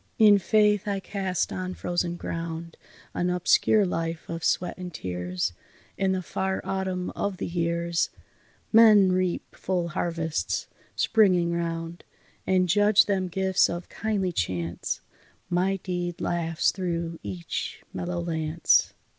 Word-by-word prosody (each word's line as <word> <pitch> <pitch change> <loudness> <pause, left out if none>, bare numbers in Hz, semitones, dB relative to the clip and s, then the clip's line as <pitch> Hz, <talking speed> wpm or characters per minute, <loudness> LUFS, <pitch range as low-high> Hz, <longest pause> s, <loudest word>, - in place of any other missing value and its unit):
In 210 -2 +7
Faith 210 +1 +3
I 200 -1 0
cast 190 -2 -2
on 185 0 -4
frozen 175 -1 -1
ground 165 -1 -5 0.4
An 175 - 0
obscure 180 +4 +3
life 165 -2 -3
of 165 0 -5
sweat 180 - +1
and 180 -1 -7
tears; 90 - -3 0.4
In 195 -1 +1
the 185 -1 -1
far 190 +2 -2
Autumn 190 -1 -2
of 200 -2 -3
the - - -3
years 170 0 0 0.6
Men 215 -4 +7
reap 185 -1 -1
full 180 -2 -1
harvests, 165 -1 -2 0.3
springing 185 -6 +3
round, 165 0 -3 0.4
And 185 -1 +3
judge 205 +3 +5
them 190 -2 0
gifts 190 +1 +2
of 175 +1 -5
kindly 205 -4 -1
chance, 85 - -2 0.5
My 185 +2 +2
deed 175 -2 -4
laughs 165 -1 0
through 170 -3 -3
each 95 -4 -5
mellow 175 0 -3
lance." 160 -1 +2
175 Hz, 130 wpm, -26 LUFS, 165-190 Hz, 0.6 s, In